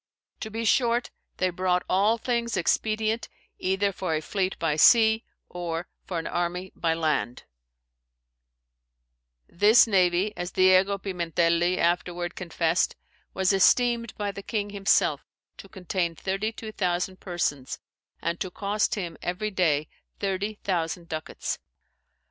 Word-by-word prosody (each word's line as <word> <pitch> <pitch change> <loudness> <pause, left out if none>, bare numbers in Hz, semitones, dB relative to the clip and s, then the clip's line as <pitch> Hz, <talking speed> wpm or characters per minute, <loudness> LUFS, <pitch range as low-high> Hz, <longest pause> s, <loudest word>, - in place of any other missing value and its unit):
To 220 - -5
be 225 +1 -4
short, 240 +1 +2 0.3
they 185 0 +1
brought 180 0 0
all 205 +5 +3
things 235 0 -1
expedient, 220 +1 0 0.3
either 190 +2 +1
for 180 -4 -2
a - - 0
fleete 190 +4 -2
by 160 -3 0
sea, 220 +6 +6 0.2
or 175 -1 -4 0.2
for 180 - -3
an 165 - -3
armie 175 +2 -2
by 165 -1 0
land. 155 -6 -1 2.0
"This 215 +6 +6
navie 190 -1 +2
(as 175 0 -5
Diego 185 +1 +4
Pimentelli 175 -2 +1
afterward 175 +1 0
confessed) 170 0 0 0.4
was 190 +1 +2
esteemed 235 +3 +3
by 205 -1 -2
the 200 - -8
king 205 -1 -3
himselfe 200 0 +2 0.3
to 195 - -12
containe 180 -3 -2
32,000 195 -2 -2
persons, 160 -7 -2 0.5
and 170 0 -1
to 185 - -3
cost 205 +3 -1
him 175 -6 -5
every 195 +5 -2
day 155 -6 +1 0.3
30 200 +2 -2
thousand 170 -2 -2
ducates. 155 0 -4
185 Hz, 125 wpm, -26 LUFS, 175-210 Hz, 2.0 s, sea